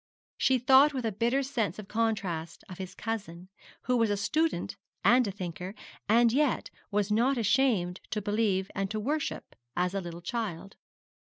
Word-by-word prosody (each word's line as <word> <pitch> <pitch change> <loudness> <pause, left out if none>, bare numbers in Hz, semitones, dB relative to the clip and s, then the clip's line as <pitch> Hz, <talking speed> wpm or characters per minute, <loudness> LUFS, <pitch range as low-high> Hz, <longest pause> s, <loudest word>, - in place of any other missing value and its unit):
She 265 - +3
thought 265 +4 +6
with 255 -3 -2
a 225 - +1
bitter 240 +7 +1
sense 245 -6 -1
of 210 -2 -8
contrast 195 -8 -2
of 185 - -10
his 185 -1 -6
cousin, 190 -6 -5 0.3
who 250 - +1
was 230 -2 +3
a 205 - +1
student 310 +11 0 0.3
and 245 -1 +5
a - - -2
thinker, 185 0 -6 0.3
and 235 +1 +5
who 250 - +1
yet 295 -4 +1 0.2
was 205 0 0
not 245 +5 +3
ashamed 220 -6 +2
to 215 - -1
believe 205 -2 0
and 195 -1 -2
to 215 - -2
worship 290 +7 -3 0.2
as 180 +1 +1
a 195 - -1
little 170 -1 -7
child. 200 -3 -4
215 Hz, 175 wpm, -29 LUFS, 190-245 Hz, 0.3 s, thought